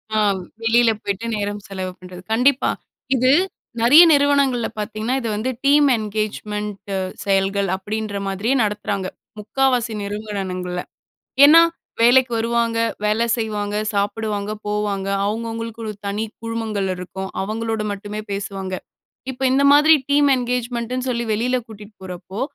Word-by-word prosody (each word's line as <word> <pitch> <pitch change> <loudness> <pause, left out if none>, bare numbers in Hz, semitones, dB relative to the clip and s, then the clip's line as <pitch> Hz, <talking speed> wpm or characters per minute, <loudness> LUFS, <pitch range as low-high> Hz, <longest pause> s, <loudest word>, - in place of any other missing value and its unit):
ஆ, - - +2 0.5
வெளியில 230 +1 +4
போய்ட்டு 200 +3 -3
நேரம் 205 0 -3
செலவு 185 -2 -5
பண்றது. 180 0 -10
கண்டிப்பா. 255 +4 +3 0.5
இது 255 +1 +3 0.5
நெறைய 290 +9 +9
நிறுவனங்கள்ல 280 -4 +3
பாத்தீங்கன்னா 215 +3 -2
இது 230 - -3
வந்து 225 +5 -2 0.2
டீம் 290 +1 +5
என்கேஜ்மெண்ட் 210 -1 -4
அ - - 0 0.3
செயல்கள் 195 0 +1
அப்டீன்ற 210 +1 -4
மாதிரியே 200 +7 0
நடத்துறாங்க, 205 -2 -2 0.3
முக்காவாசி 245 +1 0
நிறுவனங்கள்ல. 195 -4 -4 0.6
ஏன்னா, 325 +3 +9 0.4
வேலைக்கு 245 +1 +5
வருவாங்க, 230 0 0 0.3
வேலை 215 +2 +2
செய்வாங்க, 210 -2 -2 0.2
சாப்புடுவாங்க, 205 0 -2 0.2
போவாங்க. 205 -2 -2 0.2
அவுங்கவுங்களுக்கு 230 +1 -4
ஒரு 215 - -3
தனி 205 +2 -2 0.2
குழுமங்கள் 225 -4 -2
இருக்கும். 190 +1 -6
அவங்களோடு 220 +1 -2
மட்டுமே 205 +1 -6
பேசுவாங்க. 195 -1 -4 0.6
இப்ப, 265 0 -8
இந்த 275 +1 +3
மாதிரி 305 +2 +7 0.2
டீம் 285 0 +4
என்கேஜ்மெண்ட் 245 -1 -2
ன்னு 255 0 -2
சொல்லி 235 -1 -1
வெளியில 245 +4 +1
கூட்டிட்டு 210 -1 -12
போறப்போ 185 +3 -7
215 Hz, 125 wpm, -21 LUFS, 200-240 Hz, 0.6 s, நெறைய